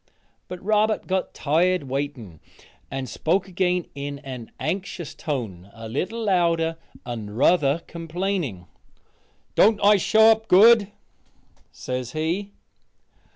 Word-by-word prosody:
But 180 - -7
Robert 215 +1 +1
got 190 0 -1
tired 175 +4 +1
waiting, 130 - -5 0.5
and 135 -1 -4
spoke 175 - 0
again 180 -1 0
in 140 0 -5
an 130 -4 -8
anxious 185 -4 -4
tone, 105 - -5
a 115 0 -8
little 185 - -3
louder, 170 -4 +1 0.3
and 110 -3 -6
ruther 150 +2 +3
complaining, 165 - -3 0.9
"Don't 215 0 +4
I 205 +1 +6
show 220 +4 +5
up 220 0 0
good?" 210 +2 +6 0.8
says 125 -1 -5
he. 170 +6 -2
165 Hz, 110 wpm, -24 LUFS, 135-195 Hz, 0.9 s, I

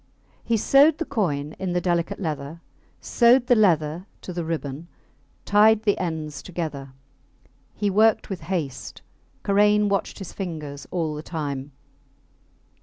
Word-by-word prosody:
He 230 - +1
sewed 285 +7 +5
the 330 - -3
coin 150 - -2
in 185 -2 -2
the 180 - +1
delicate 175 +2 -1
leather, 155 -2 -5 0.4
sewed 240 +1 +4
the 250 - +4
leather 170 -4 +2
to 180 - -7
the 175 -1 -3
ribbon, 160 -1 -4 0.6
tied 215 +1 +5
the 205 -2 +2
ends 155 -4 -4
together. 150 -7 -6 0.8
He 205 -1 0
worked 220 +2 +3
with 190 -3 -5
haste. 160 -8 -4 0.4
Karain 210 +1 +3
watched 195 0 -1
his 195 - -8
fingers 150 -7 -6
all 165 -4 -2
the 150 - -5
time. 145 -4 -5
175 Hz, 135 wpm, -24 LUFS, 150-205 Hz, 0.8 s, sewed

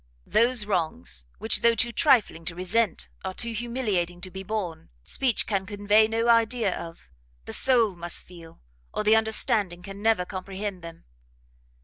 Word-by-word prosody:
Those 235 0 +3
wrongs, 155 - -1
which 220 - +2
though 235 0 +4
too 235 +2 +2
trifling 240 - +2
to 175 - -3
resent, 185 +2 0 0.2
are 190 0 -5
too 235 - -3
humiliating 215 -7 -2
to 185 0 -7
be 190 - -7
borne, 185 -5 -5
speech 245 - 0
can 195 -3 -2
convey 205 +1 +3
no 225 +1 -1
idea 230 -3 +2
of; 165 - -10 0.3
the - - -6
soul 235 -7 +3
must 170 0 0
feel, 170 -2 -14 0.3
or - - -1
the 215 +1 +5
understanding 215 -5 +2
can 195 +1 -9
never 220 -4 +2
comprehend 190 0 -6
them." 165 0 -11
205 Hz, 155 wpm, -26 LUFS, 180-225 Hz, 0.3 s, the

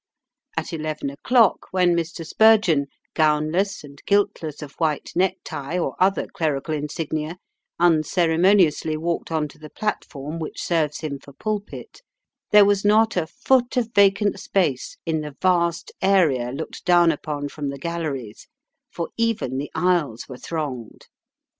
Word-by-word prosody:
At - - -3
eleven 155 -3 -3
o'clock 225 - +2
when 180 -2 +3
Mr. 165 0 -3
Spurgeon, 205 -8 +4 0.3
gownless 155 +6 +1
and 140 -1 -13
guiltless 165 -7 0
of 145 - -9
white 155 -3 -1
neck 185 +2 +2
tie, 145 +5 -4
or 175 - -2
other 195 +1 +2
clerical 155 -1 -2
insignia, 155 +2 -3 0.4
unceremoniously 165 0 +3
walked 170 +1 -3
on 155 -2 0
to 150 - -17
the 155 0 -10
platform 155 -7 -4
which 160 - -6
serves 155 -4 0
him 145 -3 -4
for 140 - -15
pulpit, 210 - -5 0.5
there 210 -1 +7
was 200 -1 +2
not 220 +2 +4
a 170 -3 0
foot 255 +6 +1
of 230 -2 0
vacant 200 0 +3
space 165 -10 -1
in 160 -2 0
the 150 -2 -7
vast 170 -2 +1
area 165 -11 +3
looked 140 +5 -6
down 175 -2 +5
upon 145 -1 -4
from 145 0 -5
the 140 - -5
galleries, 140 -8 -5 0.4
for 170 - -4
even 225 - 0
the 145 - -4
aisles 170 -10 0
were 130 - -9
thronged. 140 -9 -5
165 Hz, 145 wpm, -23 LUFS, 150-190 Hz, 0.5 s, there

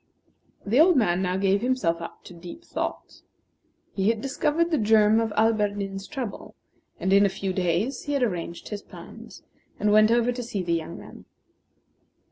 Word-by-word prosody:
The 225 +7 +2
old 340 0 +6
man 185 -7 +2
now 180 0 -1
gave 195 +1 +2
himself 240 -10 0
up 170 - -9
to - - -12
deep 175 - -11
thought. - - -5 0.7
He 195 +1 +1
had 225 -1 0
discovered 300 +6 0
the 310 - +2
germ 215 0 +4
of 225 -1 -1
Alberdin's 205 -3 0
trouble; 255 -8 -6 0.4
and 190 - +1
in 200 +1 +6
a 200 - +3
few 190 0 -4
days 185 +8 -1
he 290 - -2
had 280 -3 +1
arranged 175 -6 -4
his 210 -1 -5
plans, - - -13 0.4
and 210 - +2
went 215 +1 +6
over 235 +1 +2
to 245 0 -5
see 215 -5 -4
the 170 -1 -1
young 165 0 -3
man. - - -13
210 Hz, 175 wpm, -25 LUFS, 190-245 Hz, 0.7 s, old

